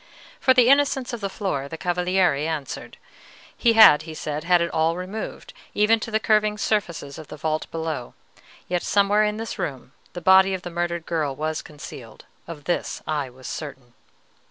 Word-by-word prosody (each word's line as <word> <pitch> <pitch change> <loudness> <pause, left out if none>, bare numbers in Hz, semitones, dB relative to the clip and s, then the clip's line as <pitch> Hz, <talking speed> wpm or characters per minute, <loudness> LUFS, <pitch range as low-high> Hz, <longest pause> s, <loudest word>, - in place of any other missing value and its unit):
For 260 - +4
the 250 -2 +6
innocence 270 -2 +3
of 235 - -5
the 200 - -2
floor 180 -9 -3
the 160 - -7
Cavaliere 180 -1 +1
answered. 155 -4 -5 0.6
He 235 -2 +3
had, 220 -10 +8
he 160 0 -9
said, 150 0 -4
had 175 0 +4
it 170 0 -1
all 160 +1 +1
removed, 190 +4 -6 0.2
even 215 +2 +4
to 225 - -5
the 220 0 +1
curving 215 -1 +2
surfaces 170 -9 -2
of 155 - -10
the 150 - -9
vault 155 0 -2
below; 160 -6 -4 0.5
yet 180 -1 -1
somewhere 205 +1 +3
in 210 0 0
this 225 0 -6
room 135 -3 -5 0.2
the 175 - -5
body 190 +2 +5
of 185 - -8
the 175 - -6
murdered 170 -1 -2
girl 150 -5 -1
was 155 +2 -3
concealed, 140 -6 -11 0.2
of 160 -3 -8
this 175 +4 -2
I 150 -4 -2
was 130 +1 -16
certain. 135 -5 -7
175 Hz, 180 wpm, -23 LUFS, 155-210 Hz, 0.6 s, had